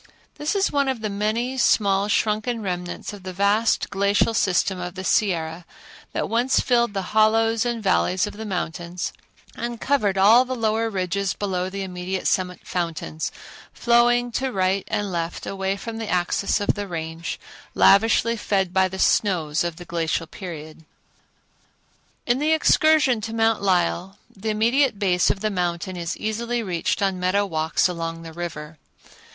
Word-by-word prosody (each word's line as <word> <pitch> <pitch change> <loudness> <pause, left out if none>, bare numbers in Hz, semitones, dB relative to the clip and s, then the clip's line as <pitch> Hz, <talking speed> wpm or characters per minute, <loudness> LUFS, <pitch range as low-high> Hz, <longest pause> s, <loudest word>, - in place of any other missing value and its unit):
This 300 +7 -1
is 395 0 +1
one 280 -1 +1
of 260 -4 -2
the 215 -2 -2
many, 225 +6 -1
small, 200 -4 +3
shrunken 215 +2 0
remnants 180 0 -4
of 205 - -10
the 185 0 -7
vast 205 +4 +1
glacial 200 +3 +2
system 190 -2 +1
of 180 0 -5
the 185 - -6
Sierra 170 -4 0 0.5
that - - -2
once 240 +4 +2
filled 235 -4 +1
the 190 -2 -3
hollows 225 +1 +3
and 235 -2 -3
valleys 185 -1 +2
of 210 - -7
the 220 - -7
mountains 175 -3 -4 0.4
and 235 -1 -5
covered 215 -9 +1
all 220 +6 +7
the 255 0 -4
lower 225 -1 0
ridges 195 0 -1
below 185 -2 -2
the 195 +1 -4
immediate 185 0 -4
summit 180 -1 0
fountains, 165 -3 -3 0.4
flowing 240 +1 +3
to 260 +2 -1
right 190 -1 0
and 205 -2 -2
left 170 -1 -3
away 195 0 -2
from 225 +3 -6
the 225 - -4
axis 180 +3 +1
of 205 - +1
the 205 -1 -5
Range, 165 -1 -5 0.4
lavishly 225 +3 +4
fed 195 -4 -1
by 190 0 +3
the 190 +1 -7
snows 170 -7 +2
of 170 -1 -3
the 175 +1 -10
glacial 165 -1 -1
period. 160 -2 -9 1.4
In 245 +1 +1
the 310 +2 +2
excursion 310 -6 +4
to 225 +1 -5
Mount 225 -1 +2
Lyell 185 0 0 0.2
the 215 +2 -4
immediate 235 +3 +2
base 185 -3 +2
of 195 - -1
the 215 0 0
mountain 180 0 -2
is 170 0 -4
easily 235 +2 -2
reached 180 0 -1
on 190 -2 0
meadow 185 +3 +1
walks 160 -2 +1
along 165 -2 -5
the 165 -1 -9
river. 160 -3 -7
195 Hz, 165 wpm, -23 LUFS, 180-225 Hz, 1.4 s, all